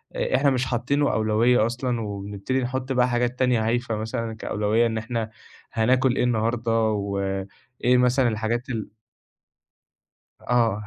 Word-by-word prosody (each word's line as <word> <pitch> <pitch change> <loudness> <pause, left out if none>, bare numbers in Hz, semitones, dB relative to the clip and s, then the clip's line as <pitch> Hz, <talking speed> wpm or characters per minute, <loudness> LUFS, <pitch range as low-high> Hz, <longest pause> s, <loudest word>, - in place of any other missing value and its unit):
آآ - - 0
إحنا 140 +2 +4
مش 130 -2 0
حاطّينه 130 +4 0
أولوية 110 +2 +3
أصلًا 120 0 -2
وبنبتدي 100 +4 -3
نحُط 130 +1 -3
بقى 125 0 +3
حاجات 120 +1 -1
تانية 125 -4 +2
هايفة 120 -1 0
مثلًا 110 +1 -3
كأولوية 110 +1 0
إن 110 -1 -3
إحنا 115 0 -3 0.4
هناكُل 125 +3 +2
إيه - - +1
النهارده 115 0 0 0.2
وإيه 100 +4 -1
مثلًا 125 +1 +3
الحاجات 115 +4 -2
ال 115 -4 -4 1.5
آه. 115 -3 +1
120 Hz, 135 wpm, -24 LUFS, 110-125 Hz, 1.5 s, إحنا